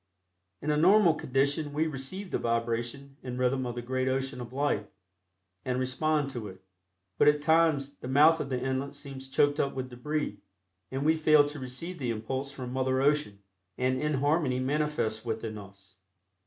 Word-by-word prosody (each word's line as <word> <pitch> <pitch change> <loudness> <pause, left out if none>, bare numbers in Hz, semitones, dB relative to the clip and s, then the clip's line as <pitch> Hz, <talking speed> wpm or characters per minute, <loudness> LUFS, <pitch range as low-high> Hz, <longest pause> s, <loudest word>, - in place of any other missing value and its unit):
In 150 - +1
a 150 - +2
normal 180 +2 +6
condition 145 +1 0
we 155 +2 +1
receive 160 +7 -4
the - - 0
vibration 115 +4 -2
and 125 -1 -5
rhythm 130 0 +1
of 120 - -4
the 120 - -5
great 130 +1 -1
ocean 130 -1 -1
of 120 -1 -8
life, 135 -6 0 0.8
and 125 0 -1
respond 140 +3 0
to 120 -5 -5
it, 95 -1 -12 0.6
but - - +5
at 150 0 +5
times 155 -3 +3
the - - -8
mouth 150 +5 +5
of 140 - -3
the 130 -2 -1
inlet 135 +2 -2
seems 135 -2 -8
choked 145 +2 +2
up 140 - 0
with 130 -1 -4
debris, 150 +5 -3 0.5
and 135 +2 -3
we 160 +1 +4
fail 155 -2 +5
to 145 0 -6
receive 145 +8 -5
the 125 -3 -2
impulse 130 +5 -3
from 125 -3 -7
Mother 130 0 +1
Ocean, 135 -8 +1 0.3
and 130 0 0
inharmony 145 -2 +1
manifests 140 -5 -1
within 110 -2 -4
us. 100 -1 -15
135 Hz, 175 wpm, -29 LUFS, 125-150 Hz, 0.8 s, normal